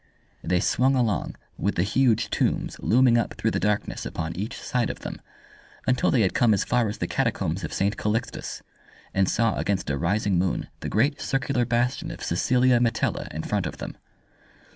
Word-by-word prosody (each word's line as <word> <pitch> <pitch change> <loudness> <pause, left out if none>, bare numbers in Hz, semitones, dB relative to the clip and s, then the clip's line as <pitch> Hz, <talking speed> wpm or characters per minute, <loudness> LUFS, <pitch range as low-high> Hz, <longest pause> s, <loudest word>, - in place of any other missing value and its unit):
They 90 - +1
swung 130 +5 +2
along, 115 - 0 0.2
with 100 - 0
the 85 - +2
huge 115 +1 +2
tombs - - 0
looming 120 0 +4
up 115 - -2
through - - 0
the - - 0
darkness 105 +1 -1
upon 80 0 -4
each 105 +5 -4
side 125 -2 -1
of - - -6
them, - - -6 0.6
until 130 0 +2
they 125 - +3
had 95 - +2
come 115 -3 +4
as 95 - 0
far 120 -3 +1
as 105 - -5
the - - -2
Catacombs 100 -8 -1
of 80 - -4
St. 100 +3 0
Calixtus, 110 +3 -3 0.5
and 95 -1 +2
saw 115 -2 +1
against 95 -7 -1
a 70 - -1
rising 95 +1 +1
moon 90 0 -1
the - - -4
great 135 +8 +1
circular 130 -2 0
bastion 120 +2 0
of - - -8
Cecilia 125 +7 +3
Metella 115 -1 0
in 80 +2 -4
front 100 -5 -1
of - - -7
them. - - -6
110 Hz, 185 wpm, -25 LUFS, 95-125 Hz, 0.6 s, looming